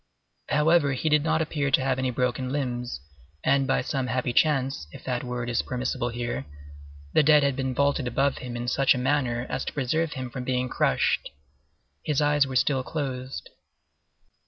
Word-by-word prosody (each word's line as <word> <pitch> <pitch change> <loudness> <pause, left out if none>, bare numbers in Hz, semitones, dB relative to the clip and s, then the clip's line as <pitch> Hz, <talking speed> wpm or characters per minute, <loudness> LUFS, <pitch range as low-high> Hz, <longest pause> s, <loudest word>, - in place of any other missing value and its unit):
However, 150 -1 +3
he 145 +5 -1
did 150 -1 +4
not 160 0 +2
appear 150 -2 -1
to 135 - +3
have 130 -1 0
any 130 -1 0
broken 125 +1 -1
limbs, 125 - -3 0.4
and, 135 0 +3
by 135 - +1
some 135 -2 -2
happy 125 -1 -1
chance, 135 - +1
if - - -11
that 125 -2 -2
word 125 -1 -4
is 120 -1 +1
permissible 125 -1 -2
here, 120 - -4 0.7
the - - +6
dead 150 0 +5
had 140 -2 +1
been 130 -1 -2
vaulted 140 -1 +1
above 135 +3 +1
him 120 -1 -6
in 120 +1 -4
such 135 +3 +3
a - - -2
manner 125 -2 0
as 130 +1 -3
to - - -4
preserve 150 +4 0
him 130 -3 -5
from 125 0 -5
being 125 0 -1
crushed. - - +1 0.7
His 150 - 0
eyes 145 -1 +3
were 130 - -5
still 130 +1 +2
closed. 130 -2 -5
130 Hz, 180 wpm, -26 LUFS, 125-145 Hz, 0.7 s, the